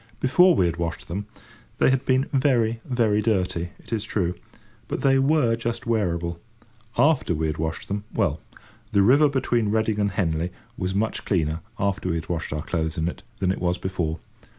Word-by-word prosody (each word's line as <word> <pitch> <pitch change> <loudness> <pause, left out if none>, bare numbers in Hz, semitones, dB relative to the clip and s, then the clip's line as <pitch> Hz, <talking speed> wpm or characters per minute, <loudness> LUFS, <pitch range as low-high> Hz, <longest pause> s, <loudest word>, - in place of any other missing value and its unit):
Before 175 +7 +5
we 95 - +3
had 85 -1 -1
washed 85 -1 -4
them, 100 +4 -4 0.5
they - - +4
had 130 -1 0
been 130 +1 +3
very, 120 -5 +2
very 115 -5 +2
dirty, 90 -5 0
it - - -9
is 110 -2 0
true; 90 -5 -1 0.5
but - - -3
they 135 -1 +4
were 135 -4 +3
just 115 0 -3
wearable. 85 -7 -1 0.6
After 145 - +3
we 80 +1 -1
had 80 0 -2
washed 80 0 -3
them—well, 100 -6 -1 0.5
the 100 -1 +5
river 140 +7 +6
between 120 -5 +1
Reading 110 0 +1
and 100 -1 +2
Henley 85 -3 -1 0.2
was 90 +1 -2
much 110 +2 -1
cleaner, 80 -4 0 0.2
after 100 -1 -1
we 85 - 0
had 80 -1 -5
washed 85 -2 -2
our 75 +1 -3
clothes 80 -2 -2
in 80 +1 0
it, 90 - -5 0.2
than 95 -1 +1
it - - -4
was 90 0 +1
before. 90 -4 -2
100 Hz, 185 wpm, -24 LUFS, 85-115 Hz, 0.6 s, river